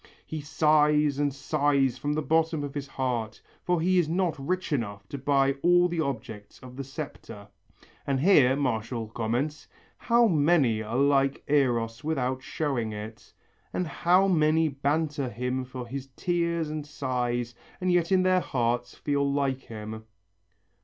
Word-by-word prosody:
He 155 -1 -5
sighs 150 -1 +3
and 145 -1 +1
sighs 140 -2 +1
from 145 +3 -1
the 155 +1 -1
bottom 160 -1 +1
of 140 -1 -5
his 140 -1 -5
heart, 125 -5 -3 0.2
for 180 -1 0
he 180 +2 +3
is 160 -3 +1
not 175 0 +1
rich 180 +4 -2
enough 100 -7 -3
to 140 - -5
buy 135 0 +2
all 175 0 +5
the 175 -1 -3
objects 110 -7 -5
of 125 -1 -11
the 140 - -5
septa." 135 -7 -8 0.6
And 135 -1 +1
here 140 -6 +5
Martial 115 -4 -2
comments, 120 +7 -2 0.3
"How 235 0 +3
many 145 - +3
are 110 +3 -3
like 140 0 +2
Eros 120 -5 +1
without 130 -4 -1
showing 130 -7 -2
it, 105 +1 -9 0.4
and 180 - -1
how 180 +4 +3
many 160 -2 +3
banter 145 0 -1
him 125 +3 -2
for 125 -1 -7
his 135 +2 -6
tears 170 -3 -1
and 155 -1 -4
sighs 125 -4 -2 0.3
and 185 0 0
yet 175 0 +2
in 185 -1 +4
their 185 0 +4
hearts 120 -5 -1
feel 140 -1 0
like 140 -2 0
him!" 110 -2 -8
140 Hz, 155 wpm, -27 LUFS, 125-155 Hz, 0.6 s, all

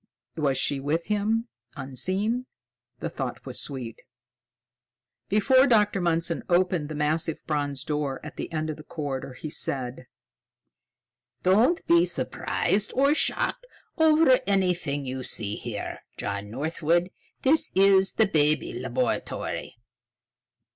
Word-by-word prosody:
Was 140 -4 +1
she 140 - +1
with 155 +5 -1
him, 215 +3 0 0.3
unseen? 195 - -2 0.5
The - - -2
thought - - -5
was - - -2
sweet. 125 -5 -5 1.3
Before 260 +7 +5
Dr. 210 -5 +3
Mundson 170 -1 +1
opened 175 -3 +2
the 155 - -5
massive 155 +2 0
bronze 145 -3 -2
door 145 -2 -2
at 150 - -8
the - - -6
end 155 -1 -2
of 155 - -8
the 155 - -11
corridor, 140 -4 -5
he 150 +4 -7
said: 130 -3 -2 1.4
"Don't 220 - +3
be 170 +1 +5
surprised 180 +3 -1
or 275 +2 +4
shocked - - 0 0.3
over 315 -5 +5
anything 180 -8 +1
you 130 0 -4
see 105 -4 -1
here, 115 -3 -5 0.2
John 100 0 -4
Northwood. 160 - 0 0.3
This 300 +4 +3
is 195 0 +5
the 220 - +4
Baby 155 -5 +2
Laboratory." 125 -1 -3
165 Hz, 120 wpm, -26 LUFS, 140-200 Hz, 1.4 s, Before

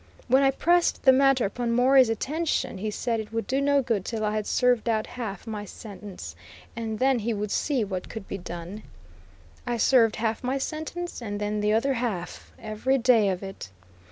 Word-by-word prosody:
When 260 +2 +5
I 270 - +5
pressed 345 +5 +2
the 265 - +8
matter 270 -1 +4
upon 235 +4 -2
Morey's 255 +1 +5
attention 295 - -1
he 215 +2 -2
said 230 +2 -2
it 215 0 -6
would 225 0 -2
do 270 +1 0
no 280 -1 +3
good 225 -6 0
till 220 +1 -3
I 210 - 0
had 215 -1 -2
served 245 -2 +2
out 220 -1 +1
half 220 -6 -6
my 215 -2 -5
sentence, 200 - -9 0.4
and 225 -1 -3
then 260 +1 +2
he 225 +1 -1
would 210 0 -3
see 275 -6 0
what 190 -3 -5
could 220 -3 -8
be 195 - -5
done. 175 +4 -7 0.9
I 240 - 0
served 230 -2 +4
half 225 +1 -2
my 260 +2 0
sentence, 315 +3 -5
and 205 -3 -4
then 210 0 -1
the 210 0 +2
other 270 +5 +2
half, 225 -8 -4
every 220 +5 0
day 230 -5 +4
of 185 0 -3
it. 195 - -8
225 Hz, 195 wpm, -26 LUFS, 210-260 Hz, 0.9 s, the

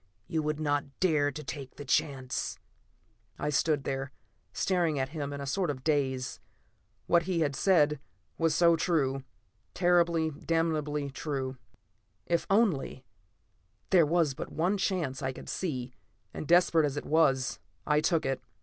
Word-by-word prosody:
You 165 -3 -1
would 150 0 -2
not 145 -2 -1
dare 155 -6 +3
to 150 +2 -7
take 135 -1 -7
the 145 - -8
chance!" 130 -1 -1 0.8
I 150 - -2
stood 150 0 +1
there, 135 +1 -3 0.4
staring 175 -5 +1
at 130 0 -1
him 145 -2 -4
in 140 - -5
a - - -4
sort 175 +5 0
of 130 -3 -4
daze. 135 -4 0 0.7
What 170 0 +3
he 170 -3 +1
had 145 -3 0
said 150 -6 +3 0.4
was 165 -1 +1
so 170 -1 +5
true; 135 -6 0 0.5
terribly, 170 -3 +3
damnably 150 -2 -1
true. 135 -2 -3 0.7
If 170 -1 0
only 185 - +1 0.9
There 175 -5 +6
was 165 -3 +2
but - - -7
one 180 +5 +1
chance 175 -9 -1
I 130 - -1
could - - -10
see, 130 -8 -3 0.4
and 155 - -6
desperate 170 -3 +5
as 145 0 -4
it - - -4
was, 135 -4 +2 0.3
I 150 0 +3
took 165 0 +1
it. 135 -1 -1
150 Hz, 150 wpm, -30 LUFS, 135-170 Hz, 0.9 s, There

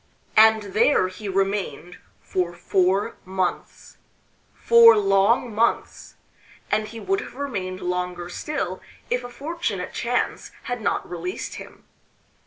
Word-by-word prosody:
And 220 0 +6
there 220 -4 +3
he 195 +2 -7
remained 195 -2 -2 0.2
for 175 -2 -2
four 190 +4 +1
months 185 -1 -4 0.6
four 230 -1 +7
long 200 +4 +2
months 230 +3 -1 0.6
and 215 0 +1
he 225 +1 -9
would 390 - -1
have - - -10
remained 195 -10 -4
longer 180 -1 -3
still 185 -1 -4 0.3
if 245 0 0
a 245 - -7
fortunate 260 - -4
chance 245 +1 -2
had 245 -2 -4
not - - -1
released 175 +1 -5
him. - - -12
205 Hz, 120 wpm, -23 LUFS, 185-235 Hz, 0.6 s, four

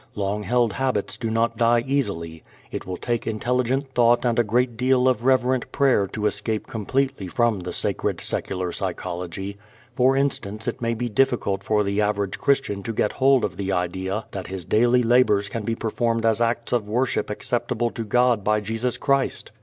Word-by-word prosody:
Long 105 +1 -1
held 120 0 +1
habits 130 -4 -1
do 115 - -3
not 115 +1 0
die 120 0 +3
easily. 95 - -2 0.3
It - - -5
will 90 -1 -4
take 120 -1 -2
intelligent 125 +4 -1
thought 120 0 +4
and 120 0 +2
a - - +5
great 120 +3 +1
deal 130 +1 +2
of 125 -2 +1
reverent 130 -1 +2
prayer 130 -8 +3
to 105 +2 -4
escape 105 +1 -1
completely 130 0 -2
from 115 +2 +1
the 90 0 -5
sacred - - -1
secular 90 -2 -2
psychology. 90 +4 -5 0.4
For 130 +2 +3
instance 110 -6 -1
it - - -3
may 115 0 0
be 120 +2 -2
difficult 115 -4 +1
for 105 +1 +1
the 100 +1 0
average 100 -2 -1
Christian 135 -8 +1
to 115 +3 -4
get 105 - +1
hold 135 -2 +3
of 90 -3 -5
the 100 -1 -2
idea 95 +3 -2
that 95 -2 -6
his 95 -3 -6
daily 120 +5 +3
labors 115 -4 +3
can 115 - -4
be 115 +2 -2
performed 115 0 -1
as 115 0 +2
acts 115 0 0
of 115 -4 0
worship 125 +4 0
acceptable 120 +1 -1
to 115 - -4
God 120 -1 +2
by 105 +1 +2
Jesus 115 +4 -2
Christ. 140 -1 0
115 Hz, 185 wpm, -23 LUFS, 100-125 Hz, 0.4 s, a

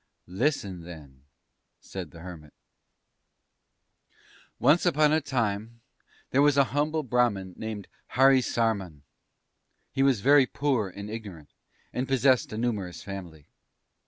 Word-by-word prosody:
"Listen, 95 - -1
then," 75 -6 -12 0.5
said 95 -4 -7
the 85 - -13
Hermit. 80 -4 -11 2.0
"Once 145 +8 +4
upon 155 -4 +3
a 160 - +3
time 115 -3 -2 0.5
there 135 - +3
was 145 -1 +4
a 140 - +7
humble 150 +2 0
Brahman 115 -7 0
named 110 -3 -6 0.3
Harisarman. 115 - +2 0.9
He 135 - -1
was 135 -6 +3
very 140 +1 +5
poor 125 -7 0
and 100 +2 -8
ignorant, 100 -9 -8 0.4
and 130 +1 -2
possessed 130 -1 +3
a 110 - -5
numerous 105 -7 -3
family. 90 -7 -8
110 Hz, 115 wpm, -27 LUFS, 95-135 Hz, 2.0 s, a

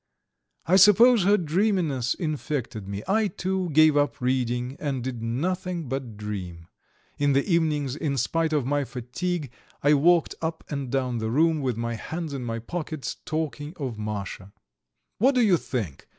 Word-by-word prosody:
I 180 +5 +4
suppose 210 +2 +7
her 205 +1 +5
dreaminess 170 - +1
infected 145 - -3
me. 100 +1 -5
I, 215 +2 +2
too, 190 -1 -2
gave 155 0 +5
up 145 -1 +1
reading, 125 0 -1
and 135 -5 -2
did 125 -3 -4
nothing 170 - -2
but 125 -4 -4
dream. 90 -6 -6 0.5
In 145 -1 +3
the 135 +1 +2
evenings, 155 -6 +1
in 150 -3 -2
spite 160 +6 0
of 150 -5 +1
my 145 +2 +1
fatigue, 135 +5 -4 0.3
I 145 +1 +5
walked 165 +4 +4
up 160 0 -3
and 140 -3 -3
down 125 -3 0
the 110 0 -2
room, 155 +5 +2
with 125 -4 -1
my 115 0 -2
hands 160 +7 -5
in 135 -2 -4
my 115 -1 -3
pockets, 155 +4 -5
talking 155 0 -3
of 130 -8 -4
Masha. 100 -2 -5 0.7
"What 260 +6 +4
do 250 - +4
you 205 -6 +5
think?" 110 - -5
145 Hz, 165 wpm, -26 LUFS, 120-170 Hz, 0.7 s, suppose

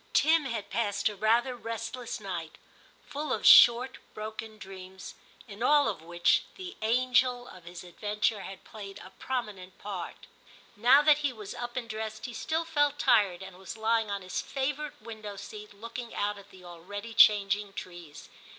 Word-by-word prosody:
Tim 315 -1 +4
had 230 -5 -4
passed 205 -1 0
a 210 - -7
rather 235 +5 +2
restless 230 +1 -5
night, 175 -6 -6 0.5
full 295 -1 -5
of - - -1
short 245 +2 +8 0.2
broken 220 0 -7
dreams, 190 -2 -10 0.3
in 205 0 -11
all 290 +3 +5
of - - -3
which, 175 +1 +2
the 375 0 -8
'anger 250 +2 +2
of 180 -7 -13
his 175 +1 -9
adventure 210 +3 -1
had 190 0 -9
played 200 -2 -9
a 185 - -12
prominent 210 -8 -4
part. 195 -4 -7 0.5
Now 245 +7 +6
that 300 -1 +5
he 290 -2 0
was 215 -5 -8
up 240 0 -6
and 240 -2 -3
dressed, 220 0 -5
he 245 - -6
still 320 +7 -2
felt 290 -3 +1
tired, 195 -9 +3
and 190 -1 -11
was 190 +3 -8
lying 220 0 +1
on 200 -1 -3
his 185 - -3
favourite 285 +2 -3
window 215 -3 -8
seat 210 +1 -9
looking 230 +3 -8
out 205 0 -1
at 200 0 -16
the 185 -1 -16
already 200 +6 -8
changing 205 -1 +5
trees. 175 -6 -9
215 Hz, 170 wpm, -29 LUFS, 195-245 Hz, 0.5 s, short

